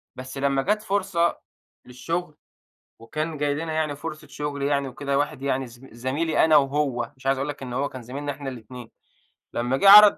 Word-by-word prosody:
بس 130 +2 -8
لمّا 135 0 +2
جات 210 +8 +1
فرصة 190 -5 +1 0.5
للشغل 155 +6 -4 0.6
وكان 155 +7 -4
جاي 145 0 +1
لنا 160 +2 -3
يعني 155 -2 0
فرصة 155 0 -7
شغل 145 -1 -4
يعني 140 -1 +1
وكده، 140 +2 -1
واحد 145 -2 -1
يعني 135 -1 0
زم 120 +3 -14
زميلي 135 +7 +1
أنا 160 -1 +6
وهو 135 -4 +1
مش 130 - -13
عايز 135 0 +3
اقول 135 +2 -2
لك 145 -2 -6
إن 125 - -5
هو 135 +3 0
كان 130 - -9
زميلنا 140 +5 -4
إحنا 140 0 -7
الاتنين، 125 -1 -10 0.6
لمّا 120 +3 0
جِه 195 - +6
عرض 210 0 +11
140 Hz, 190 wpm, -25 LUFS, 130-155 Hz, 0.6 s, عرض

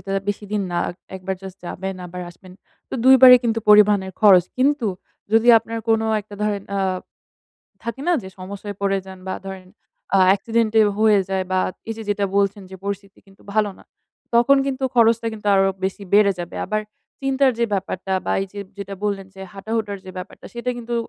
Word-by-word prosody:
এটা 195 - -6 0.2
বেশি 205 +1 -2
দিন 210 -1 0
না। 175 - -2
আক 175 - -7 0.2
১ 190 - -7
বার 190 -1 -1
জাস্ট 190 0 -9
যাবেন 190 +2 -5
আবার 180 +1 -8
আসবেন। 185 +1 -16 0.4
তো - - -6
২ 265 - +8
বারই 250 -1 +11
কিন্তু 225 -1 +1
পরিবহনের 205 -2 +5
খরচ। 190 -5 +7
কিন্তু 275 -2 +2 0.5
যদি 225 +2 +4
আপনার 225 +1 -6
কোন 225 0 +3 0.2
একটা 205 0 -13
ধরেন 205 -2 -1
আ - - 0 1.0
থাকে 235 +3 -5
না 355 - +4
যে 190 - -8
সমস্যায় 200 +2 -7
পড়ে 195 0 +1
যান 190 -1 -10
বা - - -2
ধরেন 190 -1 -8 0.5
আ - - +5
অ্যাক্সিডেন্টে 225 +1 +2 0.2
হয়ে 215 -2 +5
যায় 190 -1 -1
বা 185 - +2 0.3
এই 225 - -2
যে 225 - -7
যেটা 205 0 0
বলছেন 200 0 +1
যে 190 - -8
পরিস্থিতি 200 0 -5
কিন্তু 195 0 -21
ভালো 215 -1 +1
না। - - -18 0.5
তখন 240 +4 +5
কিন্তু 265 0 -2
খরচটা 230 -1 +4
কিন্তু 210 -1 -9
আরো 195 0 +4 0.2
বেশি 195 +2 -3
বেড়ে 205 -1 +5
যাবে। 175 -1 -6
আবার 215 0 -1 0.4
চিন্তার 270 0 +2
যে 235 - +2
ব্যাপারটা 190 0 -3
বা - - +1
এই - - -4
যে 205 - -6 0.2
যেটা 200 0 -6
বললেন 195 -2 -2
যে, 190 - -12
হাঁটা-হুটার 205 0 -3
যে - - -7
ব্যাপারটা, 185 - -10
সেইটা 240 +1 -3
কিন্তু 235 0 -5
205 Hz, 195 wpm, -21 LUFS, 195-225 Hz, 1.0 s, বারই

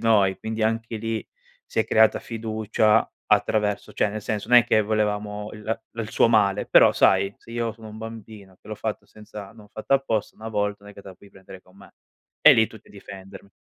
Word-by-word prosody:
noi, 100 -4 +2
quindi 110 0 -4
anche 115 +1 -1
lì 115 -1 -4 0.4
si - - -1
è - - 0
creata 110 0 +4
fiducia 110 -1 0 0.2
attraverso 105 -2 0
cioè - - +1
nel 110 +1 -5
senso 105 -1 -4
non 125 0 +8
è 120 - +3
che 110 -2 +2
volevamo 105 0 -2
il 105 - -11
la 115 - -2 0.2
il 115 0 -5
suo - - +3
male, 105 -4 +2
però - - +6
sai, 100 +1 +3
se - - -17
io 115 -1 -2
sono 110 0 -13
un 110 +1 -10
bambino 110 -4 -10
che - - -18
l'ho 110 - -5
fatto 110 0 -5
senza 105 -2 -11
non 110 -2 -16
ho 105 - -22
fatto 110 +5 -4
apposta, 115 -6 -1
1 110 +1 -8
volta 105 -1 -2
non 105 - -11
è - - -16
che 100 - -13
te - - -12
la 95 - -11
puoi 100 +2 -19
prendere 95 -1 -14
con 95 +1 -24
me; 100 - -17 0.5
e - - +9
lì 110 -1 +4
tutti 110 - -16
a - - -18
difendermi. 100 0 -12
110 Hz, 230 wpm, -24 LUFS, 100-110 Hz, 0.5 s, e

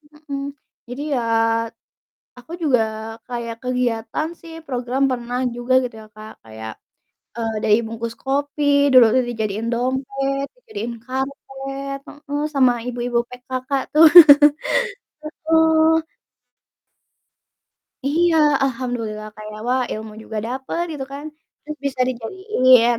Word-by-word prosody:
mhm - - -17
mhm. 275 0 -3 0.5
Jadi 250 +3 -6
ya, 250 - +1 1.2
aku 250 +6 -13
juga 265 -7 +3 0.5
kayak 235 -2 -5
kegiatan 250 +3 -1
sih 330 -1 -12
program 250 0 -2
pernah 245 0 -3 0.2
juga 245 +1 -2
gitu 245 - -5
ya - - -14
Kak, 215 0 -10
kayak, 110 0 -8 0.7
eee, 225 -1 -2
dari 210 -1 +5
bungkus 230 +1 -5
kopi 285 +2 -1 0.3
dulu 255 -1 +9
udah 255 - +3
dijadiin 220 -1 -3
dompet, 270 +3 -1
dijadiin 435 - -6
karpet, 270 +1 -5
heeh, 290 0 -5
sama 260 -3 +4
ibu-ibu 240 -1 -1
PKK 255 +1 -7 0.2
tuh. 315 +2 +8 1.4
Heeh. 320 0 +4 2.0
Iya 330 +3 +3 0.3
alhamdulillah 235 -5 -3
kayak 215 0 -9
wah 255 +1 +2
ilmu 215 0 -7
juga 220 0 -5
dapet 265 +7 -3
gitu 280 -3 -5
kan, 285 +1 -7 0.4
terus 305 +1 -7
bisa 265 -2 -3
dijadiin, 255 - +3
255 Hz, 115 wpm, -21 LUFS, 235-280 Hz, 2.0 s, dulu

